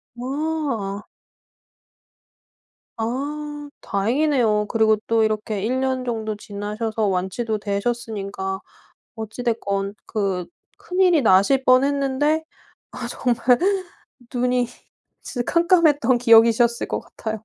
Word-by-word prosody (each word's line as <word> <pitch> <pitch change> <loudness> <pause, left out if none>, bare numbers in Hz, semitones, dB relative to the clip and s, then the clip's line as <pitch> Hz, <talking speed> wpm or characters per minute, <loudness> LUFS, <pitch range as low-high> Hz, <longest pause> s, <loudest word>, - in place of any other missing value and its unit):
와. 260 -6 -3 1.9
아 290 +5 -4
다행이네요. 225 0 +1
그리고 220 -1 +3
또 225 -1 +3
이렇게 215 -1 -1
1 250 +4 0
년 260 -1 -1
정도 220 -3 -3
지나셔서 210 +1 -3
완치도 195 +4 -1
되셨으니까 200 -2 -3 0.6
어찌 220 +2 -6
됐건 200 -4 -1
그 195 -4 -2 0.3
큰일이 360 -3 +2
나실 220 +5 +4
뻔 255 0 +5
했는데 285 +2 +1 0.5
아 - - -5
정말 245 -3 0 1.0
눈이 250 0 +1 0.6
진짜 245 -2 -4
캄캄했던 320 -8 +4
기억이셨을 235 0 +4
것 - - -2
같아요. 220 -1 -7
235 Hz, 215 characters per minute, -22 LUFS, 210-265 Hz, 1.9 s, 뻔